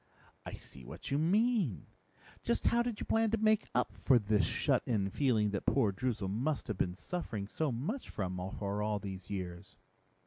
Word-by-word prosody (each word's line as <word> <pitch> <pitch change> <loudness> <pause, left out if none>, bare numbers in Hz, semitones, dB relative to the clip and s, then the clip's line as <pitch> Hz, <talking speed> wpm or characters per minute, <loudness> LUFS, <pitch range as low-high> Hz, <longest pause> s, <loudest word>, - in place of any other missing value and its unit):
"I - - -6
see 65 - -8
what - - -8
you 140 - +2
mean. 195 - +2 0.6
Just 115 - 0
how 235 - +4
did 240 -3 -2
you - - -3
plan 225 0 +3
to 225 - +1
make 215 0 +3
up - - +1
for 130 - +6
this 105 -3 +2
shut - - +2
in 100 -5 +1
feeling 110 -7 +2
that 100 - -3
poor 115 -7 +4
Droozle 110 0 -2
must 130 +10 -1
have 105 - -2
been 90 0 0
suffering 110 - -4
so 155 +6 -1
much 160 - -3
from 95 -3 -3 0.2
for 100 0 -2
all 105 0 +1
these 95 -2 -7
years?" 95 -1 -5
110 Hz, 185 wpm, -33 LUFS, 100-160 Hz, 0.6 s, for